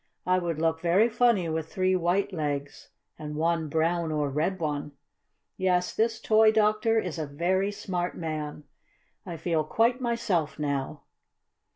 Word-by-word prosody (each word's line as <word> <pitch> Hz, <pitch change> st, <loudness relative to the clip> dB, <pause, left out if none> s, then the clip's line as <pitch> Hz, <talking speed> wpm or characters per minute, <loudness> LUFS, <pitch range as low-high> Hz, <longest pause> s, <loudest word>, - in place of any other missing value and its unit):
"I 185 Hz, 0 st, +3 dB
would 170 Hz, -3 st, -2 dB
look 160 Hz, 0 st, 0 dB
very 185 Hz, +7 st, +3 dB
funny 230 Hz, -6 st, +2 dB
with 160 Hz, 0 st, -3 dB
three 185 Hz, 0 st, +1 dB
white 185 Hz, +3 st, 0 dB
legs 145 Hz, -3 st, -4 dB, 0.3 s
and 150 Hz, -1 st, -6 dB
one 165 Hz, 0 st, 0 dB
brown 165 Hz, +1 st, 0 dB
or 150 Hz, -2 st, -1 dB
red 165 Hz, +7 st, -1 dB
one. 150 Hz, -2 st, -3 dB, 0.6 s
Yes, 180 Hz, -1 st, +1 dB
this 225 Hz, 0 st, 0 dB
toy 220 Hz, -1 st, +5 dB
doctor 215 Hz, +1 st, +2 dB
is 180 Hz, -6 st, -2 dB
a 155 Hz, -, -3 dB
very 185 Hz, +7 st, 0 dB
smart 180 Hz, -3 st, -3 dB
man. 155 Hz, -2 st, -4 dB, 0.6 s
I 170 Hz, -2 st, -5 dB
feel 160 Hz, -2 st, 0 dB
quite 235 Hz, -, +1 dB
myself 210 Hz, -10 st, -1 dB
now." 140 Hz, 0 st, -3 dB
170 Hz, 150 wpm, -27 LUFS, 155-200 Hz, 0.6 s, toy